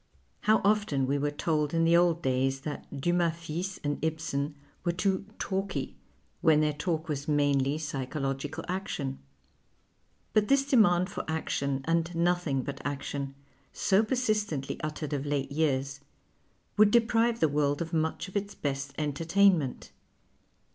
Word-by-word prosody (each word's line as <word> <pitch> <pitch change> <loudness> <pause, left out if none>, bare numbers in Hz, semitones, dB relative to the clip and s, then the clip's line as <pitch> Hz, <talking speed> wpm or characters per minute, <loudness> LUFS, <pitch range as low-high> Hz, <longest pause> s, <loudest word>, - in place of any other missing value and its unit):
How 215 0 +3
often 200 -10 +2
we 140 +2 0
were 145 +1 +1
told 150 +1 -1
in 165 - +3
the 165 +1 +5
old 170 -1 +3
days 135 +1 +1
that 145 -1 -6
Dumas 175 0 +2
fils 170 +3 -5
and 145 0 -2
Ibsen 155 -2 -2 0.3
were 175 - +1
too 190 +2 0
" - - -25
talky," 195 0 -2 0.5
when 160 -3 +5
their 150 0 +2
talk 160 +1 -2
was 145 -1 -3
mainly 145 -1 +2
psychological 140 +1 -3
action. 175 -7 -3 1.1
lint 210 -1 +3
this 275 0 +4
demand 190 -9 +4
for - - -4
action 140 -4 -2
and 165 +1 0
nothing 170 -6 +1
but 140 +1 -6
action, 140 -1 -4 0.4
so 195 +2 +3
persistently 215 - -1
uttered 155 -1 -4
of 145 0 -2
late 140 -1 -1
years, 140 -2 0 0.8
wo\ild 210 -1 +6
deprive 235 0 +3
the 160 - +4
world 145 -1 +1
of 165 -1 -4
nuieii 160 +2 -1
of 185 - -13
its 200 0 -2
best 140 -1 -3
entertainment. 160 +1 +2
160 Hz, 145 wpm, -29 LUFS, 140-185 Hz, 1.1 s, wo\ild